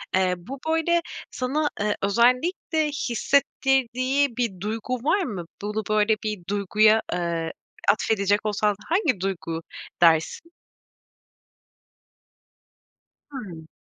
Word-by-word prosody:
Eee, 185 -1 +2
bu, 260 +11 -9
böyle, 325 +1 +2 0.3
sana, 285 +4 -1
eee, 210 0 0
özellikle 255 - +2
hissettirdiği 270 -1 +1
bir 230 -7 -1
duygu 225 +4 -2
var 310 - +1
mı? 195 - -5 0.2
Bunu, 210 +1 -2
böyle, 215 +1 +3
bir 215 -2 -2
duyguya, 215 +2 +3
eee, 170 -2 -2 0.4
atfedecek 205 -1 +1
olsan 210 0 +1
hangi 325 - +2
duygu 170 -3 -3 0.4
dersin? 165 - +3 2.8
Hımm. 180 - -8
220 Hz, 95 wpm, -24 LUFS, 195-270 Hz, 2.8 s, böyle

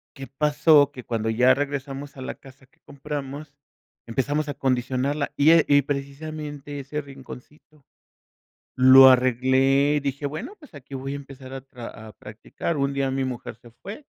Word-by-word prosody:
¿Qué 135 -2 -8
pasó? 145 +1 +3
Que 125 -4 -10
cuando 110 -1 -2
ya 125 +3 +4
regresamos 140 0 -5
a - - -8
la 130 - -5
casa 135 0 -17
que 130 - -35
compramos, 145 +1 -7 0.5
empezamos 145 +5 -1
a - - -2
condicionarla 130 +2 -1
y 150 +3 +5
e 165 -1 +5
y 145 0 +5
precisamente 145 +1 -6
ese 145 +2 -5
rinconcito 140 +1 -14 0.9
lo 130 +1 +9
arreglé, 130 +3 +3
dije: 140 +1 -3
"Bueno, 155 - -6
pues 300 - -18
aquí 140 -1 -11
voy 135 +1 -5
a - - -3
empezar 135 -2 -11 0.2
a 115 -2 -9
a - - -12
practicar, 110 +11 -6
un 140 0 0
día 135 -1 -1
mi 135 0 -1
mujer 125 -4 -6
se 120 +1 -17
fue 200 - -10
140 Hz, 160 wpm, -24 LUFS, 130-145 Hz, 0.9 s, lo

